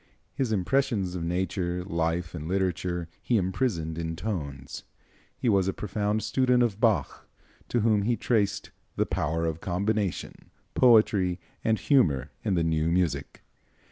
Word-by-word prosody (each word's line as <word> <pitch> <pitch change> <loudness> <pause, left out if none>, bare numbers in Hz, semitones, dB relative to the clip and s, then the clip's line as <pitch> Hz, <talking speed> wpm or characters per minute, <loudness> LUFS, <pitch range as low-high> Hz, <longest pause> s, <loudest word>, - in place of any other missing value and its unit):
His 130 -4 -1
impressions 105 -2 +1
of 90 - -4
nature, 90 +1 -1
life 85 -1 -1
and 80 -2 -6
literature 90 -2 -1
he 120 - +1
imprisoned 90 -5 -1
in 80 0 -3
tones. 70 -10 -5 0.5
He - - -2
was 100 -4 +3
a 95 - 0
profound 105 +2 -1
student 125 -2 +3
of 110 -4 -1
Bach, 110 - 0 0.4
to 120 - +1
whom 110 -2 +3
he 115 +3 +1
traced 105 -4 0 0.2
"the - - +1
power 80 +2 -1
of 80 0 -3
combination, 100 +1 -2 0.2
poetry 105 -7 +4 0.2
and 110 0 +2
humor 75 - +2
in 100 -4 +1
the 85 - +2
new 80 0 +1
music." 90 -2 -1
95 Hz, 140 wpm, -27 LUFS, 85-110 Hz, 0.5 s, poetry